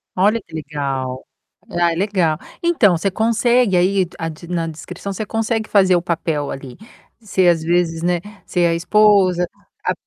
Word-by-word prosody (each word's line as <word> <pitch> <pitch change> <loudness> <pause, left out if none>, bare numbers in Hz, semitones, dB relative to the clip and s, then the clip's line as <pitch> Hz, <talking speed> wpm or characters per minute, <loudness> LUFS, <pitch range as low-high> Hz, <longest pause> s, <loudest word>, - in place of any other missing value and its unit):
Olha 210 +5 +3
que 165 - -21
legal. 140 -4 -4 0.5
Ah, 175 -1 +1
é - - -2
legal. 180 -4 0 0.2
Então 245 - +3
você 195 +4 -1
consegue 230 0 +2
aí 185 +1 +2
a 165 -1 -3
de 160 +2 -10
na 170 -2 -1
descrição, 180 +5 -7
você 215 - -4
consegue 225 0 -1
fazer 190 -3 +4
o 175 - 0
papel 160 -4 -2
ali, 135 -2 -8 0.4
ser, 190 -4 +1
às 165 -2 +3
vezes, 165 -1 0
né, 175 0 +1 0.3
ser 175 -1 +1
a 165 - +2
esposa, 185 0 +3 0.4
a - - +3
180 Hz, 165 wpm, -19 LUFS, 165-200 Hz, 0.5 s, fazer